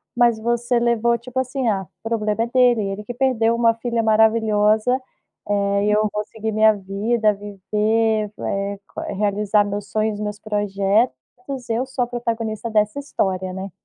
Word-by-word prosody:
mas 240 Hz, -2 st, +3 dB
você 240 Hz, +1 st, 0 dB
levou 235 Hz, 0 st, +2 dB
tipo 250 Hz, +2 st, -5 dB
assim, 260 Hz, 0 st, -2 dB
ah, 195 Hz, -5 st, 0 dB, 0.2 s
problema 225 Hz, -1 st, 0 dB
é 235 Hz, -, -2 dB
dele 245 Hz, -2 st, +4 dB
ele, 195 Hz, +1 st, -4 dB
que 245 Hz, -, -6 dB
perdeu 235 Hz, -3 st, +2 dB
uma 230 Hz, -1 st, +3 dB
filha 230 Hz, 0 st, -2 dB
maravilhosa, 220 Hz, +2 st, +3 dB, 0.5 s
eh, 200 Hz, 0 st, +1 dB
e 210 Hz, -, +2 dB
eu 215 Hz, +1 st, +3 dB
vou 210 Hz, 0 st, -1 dB
seguir 220 Hz, +1 st, -5 dB
minha 215 Hz, 0 st, +5 dB
vida 210 Hz, +3 st, 0 dB
viver, 210 Hz, +2 st, 0 dB
eh, 200 Hz, 0 st, -2 dB, 0.4 s
realizar 205 Hz, +1 st, +2 dB
meus 205 Hz, 0 st, -4 dB
sonhos 215 Hz, -1 st, 0 dB
meus 210 Hz, 0 st, -4 dB
projetos, 205 Hz, -, +1 dB, 0.5 s
e 225 Hz, -, +1 dB
eu 250 Hz, +3 st, 0 dB
sou 265 Hz, -1 st, -1 dB
a -, -, -3 dB
protagonista 230 Hz, -2 st, -3 dB
dessa 215 Hz, +4 st, +1 dB
história, 190 Hz, -9 st, -2 dB
né. 190 Hz, +1 st, -6 dB
220 Hz, 160 wpm, -21 LUFS, 205-235 Hz, 0.5 s, minha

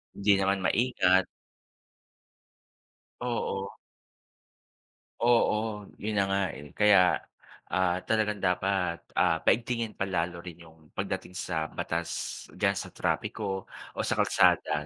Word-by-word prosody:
Hindi 100 Hz, 0 st, +4 dB
naman 95 Hz, 0 st, +2 dB
maingat. 95 Hz, -3 st, +3 dB, 1.9 s
Oo. 115 Hz, -5 st, -2 dB, 1.5 s
Oo, 120 Hz, 0 st, +4 dB, 0.5 s
yun 110 Hz, +1 st, -1 dB
na -, -, +4 dB
nga 95 Hz, 0 st, +1 dB
eh, 75 Hz, 0 st, -10 dB
kaya, 100 Hz, -4 st, +5 dB, 0.6 s
ah, 90 Hz, -1 st, +2 dB
talagang 105 Hz, -2 st, +1 dB
dapat, 90 Hz, -2 st, 0 dB, 0.2 s
ah, 80 Hz, -3 st, +3 dB
paigtingin 115 Hz, -1 st, 0 dB
pa 100 Hz, -, 0 dB
lalo 85 Hz, -2 st, -1 dB
rin 85 Hz, -1 st, -9 dB
yung 80 Hz, -1 st, -16 dB
pagdating 90 Hz, -, -4 dB
sa 80 Hz, -3 st, -2 dB
batas -, -, -4 dB
d'yan -, -, +1 dB
sa -, -, -6 dB
trapiko 95 Hz, -3 st, -2 dB, 0.3 s
o -, -, -5 dB
sa -, -, +1 dB
kalsada, 75 Hz, -1 st, +3 dB
95 Hz, 115 wpm, -28 LUFS, 90-105 Hz, 1.9 s, kaya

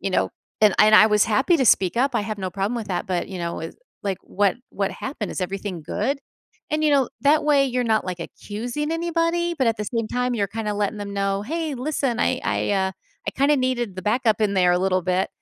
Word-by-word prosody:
you 195 Hz, -, -2 dB
know, -, -, +1 dB, 0.3 s
"And 210 Hz, -2 st, +5 dB
I 210 Hz, -, +7 dB
I 215 Hz, 0 st, +8 dB
was 210 Hz, -1 st, +4 dB
happy 265 Hz, -, +3 dB
to 260 Hz, -, +2 dB
speak 190 Hz, -1 st, +4 dB
up, 265 Hz, +1 st, +1 dB
I 225 Hz, -, +1 dB
have 215 Hz, 0 st, -4 dB
no 190 Hz, -1 st, -3 dB
problem 200 Hz, +6 st, -2 dB
with 220 Hz, -4 st, -5 dB
that, 180 Hz, -2 st, -2 dB
but 180 Hz, -1 st, -2 dB
you 190 Hz, -, -6 dB
know, 170 Hz, -2 st, -3 dB
it" 165 Hz, -, -6 dB, 0.3 s
like, 195 Hz, -2 st, -2 dB
"What 200 Hz, +1 st, +1 dB
what 195 Hz, -1 st, -1 dB
happened? 260 Hz, -6 st, -5 dB
Is -, -, -4 dB
everything 190 Hz, -2 st, -4 dB
good?" 220 Hz, -, -1 dB, 0.5 s
And, 305 Hz, +1 st, 0 dB
you 305 Hz, -, +4 dB
know, 275 Hz, -4 st, +3 dB
that 295 Hz, +5 st, +3 dB
way 285 Hz, -2 st, +4 dB
you're 250 Hz, -1 st, -1 dB
not, 220 Hz, -2 st, +2 dB
like, 180 Hz, -1 st, -4 dB
accusing 240 Hz, -, -4 dB
anybody 335 Hz, +1 st, 0 dB
but 265 Hz, -6 st, 0 dB
at 225 Hz, -, 0 dB
the 210 Hz, -, -3 dB
same 230 Hz, +1 st, -2 dB
time 250 Hz, 0 st, -1 dB
you're 205 Hz, -4 st, 0 dB
kinda 215 Hz, +1 st, -3 dB
letting 205 Hz, +1 st, -1 dB
them 200 Hz, -1 st, -5 dB
know, 195 Hz, 0 st, 0 dB
"Hey, 315 Hz, +3 st, -3 dB
listen, 260 Hz, -2 st, -1 dB
I -, -, +1 dB
I, -, -, 0 dB
uh, 190 Hz, -1 st, +1 dB, 0.4 s
I -, -, +2 dB
kinda 280 Hz, +5 st, +3 dB
needed 250 Hz, -5 st, -1 dB
the 185 Hz, -, -5 dB
backup 220 Hz, +1 st, +1 dB
in 205 Hz, -2 st, +1 dB
there 180 Hz, -2 st, +4 dB
a 175 Hz, -, +2 dB
little 185 Hz, -1 st, +1 dB
bit." 185 Hz, +1 st, 0 dB
215 Hz, 240 wpm, -23 LUFS, 195-265 Hz, 0.5 s, I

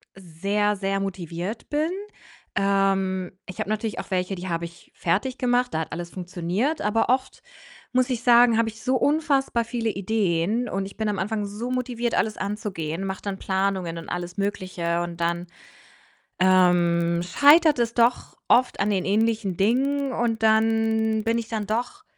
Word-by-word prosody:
sehr, 200 Hz, +4 st, -1 dB
sehr 195 Hz, 0 st, -1 dB
motiviert 185 Hz, +2 st, -5 dB
bin. 305 Hz, +2 st, 0 dB, 0.7 s
Ähm, 195 Hz, -2 st, +1 dB
ich 185 Hz, -, -10 dB
habe -, -, -2 dB
natürlich 215 Hz, 0 st, -2 dB
auch -, -, -7 dB
welche, 185 Hz, +1 st, -1 dB
die 185 Hz, +1 st, -7 dB
habe 170 Hz, -1 st, -2 dB
ich 170 Hz, 0 st, -14 dB
fertig 210 Hz, +10 st, -1 dB
gemacht, 245 Hz, 0 st, +1 dB
da 160 Hz, -, 0 dB
hat 160 Hz, -, -6 dB
alles 170 Hz, +1 st, -5 dB
funktioniert, 185 Hz, -, -2 dB
aber 210 Hz, +3 st, +1 dB
oft 260 Hz, +1 st, 0 dB, 0.5 s
muss 255 Hz, +1 st, +2 dB
ich 240 Hz, -2 st, -2 dB
sagen, 240 Hz, -1 st, +6 dB
habe 230 Hz, -1 st, +2 dB
ich 220 Hz, 0 st, -12 dB
so 260 Hz, +2 st, +1 dB
unfassbar 275 Hz, -4 st, +1 dB
viele 230 Hz, -1 st, -2 dB
Ideen 205 Hz, +2 st, 0 dB
und 195 Hz, 0 st, -2 dB
ich 195 Hz, -, -10 dB
bin 220 Hz, -1 st, -1 dB
am 200 Hz, -, -2 dB
Anfang 210 Hz, +1 st, -2 dB
so 215 Hz, +5 st, -5 dB
motiviert, 245 Hz, -2 st, -1 dB
alles 215 Hz, -1 st, 0 dB
anzugehen, 195 Hz, -5 st, -4 dB
mache 190 Hz, -1 st, -4 dB
dann 200 Hz, -2 st, -3 dB
Planungen 190 Hz, -3 st, -1 dB
und 165 Hz, -, -8 dB
alles 175 Hz, 0 st, -5 dB
Mögliche 185 Hz, -4 st, -2 dB
und 170 Hz, -1 st, -5 dB
dann, 170 Hz, +1 st, -1 dB, 0.9 s
ähm, 175 Hz, -2 st, +3 dB
scheitert 295 Hz, -, +5 dB
es 235 Hz, -1 st, 0 dB
doch 240 Hz, +1 st, +1 dB
oft 250 Hz, +1 st, +3 dB
an 205 Hz, -, +1 dB
den 190 Hz, -3 st, 0 dB
ähnlichen 215 Hz, -2 st, +1 dB
Dingen, 270 Hz, +6 st, +1 dB
und 230 Hz, -2 st, -1 dB
dann 220 Hz, 0 st, +2 dB
bin 230 Hz, +1 st, +1 dB
ich 230 Hz, -, -3 dB
dann 220 Hz, -3 st, -3 dB
doch 245 Hz, -, -3 dB
210 Hz, 170 wpm, -24 LUFS, 185-235 Hz, 0.9 s, sagen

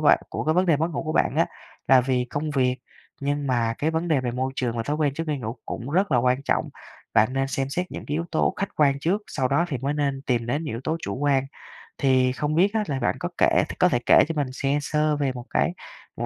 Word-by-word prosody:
bạn -, -, +5 dB
của -, -, -4 dB
cái 155 Hz, -, +2 dB
vấn 180 Hz, +2 st, +3 dB
đề 165 Hz, -4 st, +4 dB
mất 160 Hz, +3 st, 0 dB
ngủ 165 Hz, -, -3 dB
của 155 Hz, -1 st, -3 dB
bạn -, -, +1 dB
á, -, -, +4 dB, 0.4 s
là 130 Hz, -1 st, +7 dB
vì 125 Hz, -1 st, 0 dB
công 145 Hz, +5 st, -3 dB
việc, 130 Hz, -3 st, +1 dB, 0.4 s
nhưng 145 Hz, 0 st, -1 dB
mà 120 Hz, -3 st, +1 dB
cái 155 Hz, -, +1 dB
vấn 165 Hz, +2 st, -2 dB
đề 150 Hz, -5 st, +3 dB
về 125 Hz, -1 st, -2 dB
môi 130 Hz, +2 st, -2 dB
trường 120 Hz, -2 st, -1 dB
và 115 Hz, -, -1 dB
thói 145 Hz, +6 st, -2 dB
quen 150 Hz, -3 st, 0 dB
trước 165 Hz, -, -3 dB
khi 150 Hz, -2 st, -1 dB
ngủ 115 Hz, 0 st, -5 dB
cũng 120 Hz, +4 st, -5 dB
rất 185 Hz, +1 st, +1 dB
là 125 Hz, -, +4 dB
quan 125 Hz, +2 st, +2 dB
trọng. -, -, 0 dB, 0.5 s
Bạn 110 Hz, +2 st, +4 dB
nên 135 Hz, 0 st, 0 dB
xem 135 Hz, 0 st, -2 dB
xét 180 Hz, +5 st, -3 dB
những -, -, -7 dB
cái 145 Hz, -, -3 dB
yếu 165 Hz, +2 st, -1 dB
tố 160 Hz, -, +1 dB
khách 200 Hz, -, -2 dB
quan 140 Hz, -2 st, +3 dB
trước, 185 Hz, +8 st, 0 dB
sau 130 Hz, -3 st, -1 dB
đó 140 Hz, +6 st, +2 dB
thì 135 Hz, -, -3 dB
mới 140 Hz, +4 st, -2 dB
nên 140 Hz, -2 st, -1 dB
tìm 120 Hz, -4 st, 0 dB
đến 145 Hz, +7 st, -1 dB
những 150 Hz, -, -4 dB
yếu 115 Hz, -, -5 dB
tố 160 Hz, +1 st, 0 dB
chủ 100 Hz, -, -3 dB
quan. 140 Hz, -1 st, +1 dB, 0.5 s
Thì 130 Hz, -2 st, +3 dB
không 150 Hz, +3 st, -2 dB
biết 195 Hz, +5 st, +3 dB
á 220 Hz, -1 st, +1 dB
là 135 Hz, -2 st, -2 dB
bạn 120 Hz, -, 0 dB
có -, -, -3 dB
kể -, -, +4 dB, 0.2 s
có -, -, +5 dB
thể 120 Hz, -, +1 dB
kể -, -, +7 dB
cho 165 Hz, -, -3 dB
mình 145 Hz, -3 st, 0 dB, 0.2 s
nghe 140 Hz, +1 st, +2 dB
sơ 150 Hz, +1 st, +1 dB
về 140 Hz, -2 st, 0 dB
một 125 Hz, -1 st, -8 dB
cái -, -, +1 dB, 0.4 s
một -, -, -2 dB
140 Hz, 275 wpm, -24 LUFS, 130-155 Hz, 0.5 s, là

